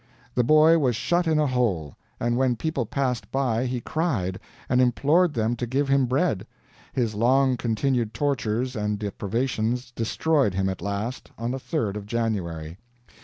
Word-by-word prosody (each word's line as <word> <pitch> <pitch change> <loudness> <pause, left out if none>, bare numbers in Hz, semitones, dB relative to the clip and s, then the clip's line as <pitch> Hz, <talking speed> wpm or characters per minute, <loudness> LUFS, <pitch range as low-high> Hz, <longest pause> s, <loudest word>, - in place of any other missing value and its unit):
The 125 - +2
boy 155 +5 +6
was 125 -6 +1
shut 175 +9 +1
in 160 -1 +3
a 150 - +3
hole, 110 - 0 0.2
and 120 0 0
when 130 -1 +2
people 135 -2 -2
passed 125 -7 -2
by 130 -2 0
he 125 0 -2
cried, 115 - -1 0.3
and 125 +1 +3
implored 145 +7 +3
them 115 +1 +1
to 120 - -3
give 135 +3 0
him 135 -2 +3
bread. 130 - 0 0.4
His 115 -4 -1
long 130 +4 +3
continued 120 0 0
tortures 125 -1 -1
and 105 -1 -1
deprivations 115 +4 -2
destroyed 125 - +1
him 95 0 +1
at 95 - -5
last, 100 +5 -4
on 115 +1 -2
the 135 - -3
third 115 - -2
of 105 -1 -6
January. 95 -8 -3
120 Hz, 165 wpm, -25 LUFS, 110-135 Hz, 0.4 s, boy